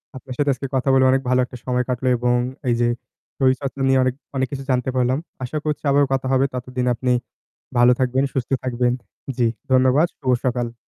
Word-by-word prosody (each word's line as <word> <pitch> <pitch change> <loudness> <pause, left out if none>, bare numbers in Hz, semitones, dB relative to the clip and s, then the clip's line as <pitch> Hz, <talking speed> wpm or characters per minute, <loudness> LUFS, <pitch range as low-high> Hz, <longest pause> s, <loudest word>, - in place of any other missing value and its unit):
আপনার 130 0 -8
সাথে 145 -1 +1
আজকে 130 +2 -6
কথা 130 +1 +1
বলে 130 0 +5
অনেক 135 0 +2
ভালো 125 0 +3
একটা 125 0 -10
সময় 125 0 +1
কাটলো 125 +1 -1
এবং 120 +1 +1 0.3
এই 120 - +3
যে 120 - +3 0.5
শরীর 130 -1 +3
চর্চা 140 0 -5
নিয়ে 135 0 +4
অনেক, 130 - +1 0.2
অনেক 130 0 +1
কিছু 135 -1 -5
জানতে 125 +1 0
পারলাম। 130 +1 +2 0.3
আশা 130 +5 -3
করছি 150 -1 -2
আবারও 140 0 +4
কথা 130 0 -1
হবে। 130 +1 +3
ততদিন 125 0 -3
আপনি 125 +2 -1 0.7
ভালো 120 +1 +6
থাকবেন, 130 +1 +1
সুস্থ 130 -3 -2
থাকবেন। 125 -1 +1 0.4
জি, 120 -2 +3 0.2
ধন্যবাদ। 130 +5 +4
শুভ 130 -3 0
সকাল। 120 -2 -1
130 Hz, 200 wpm, -21 LUFS, 125-135 Hz, 0.7 s, ভালো